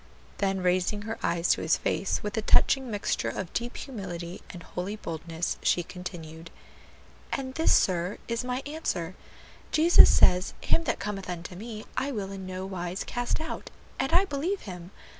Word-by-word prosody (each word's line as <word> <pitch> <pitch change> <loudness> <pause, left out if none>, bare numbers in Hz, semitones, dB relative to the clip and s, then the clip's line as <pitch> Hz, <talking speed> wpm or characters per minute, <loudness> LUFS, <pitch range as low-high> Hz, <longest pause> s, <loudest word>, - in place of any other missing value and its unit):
'" - - -26
Then 195 -1 +1
raising 185 +3 +1
her 225 +1 -4
eyes 170 0 +1
to - - +4
his 160 - +3
face 195 - 0
with 210 -1 -3
a 220 - +1
touching 265 +4 +4
mixture 205 -2 -1
of 180 -3 -5
deep 240 +1 -2
humility 180 -8 -6
and 175 -2 -9
holy 185 +6 -4
boldness, 165 -3 -3
she 175 - +2
continued, 165 -2 -8 0.8
"And 260 -1 -3
this, 320 +4 +3
sir 180 0 +3
is 235 +1 -1
my 250 +1 -2
answer: 285 - -2 0.6
Jesus 330 +3 +8
says, 180 +1 +5
'Him 330 - +2
that - - 0
cometh 195 -2 -4
unto 175 0 -5
me, 215 +2 -7
I 280 - 0
will 200 -6 -3
in 190 -1 -6
no 185 0 -4
wise 185 -1 -3
cast 245 +4 -2
out;' 320 +1 -5 0.3
and 270 0 0
I 360 +4 +6
believe 350 +5 -2
Him. 180 -3 -8
195 Hz, 175 wpm, -28 LUFS, 180-245 Hz, 0.8 s, Jesus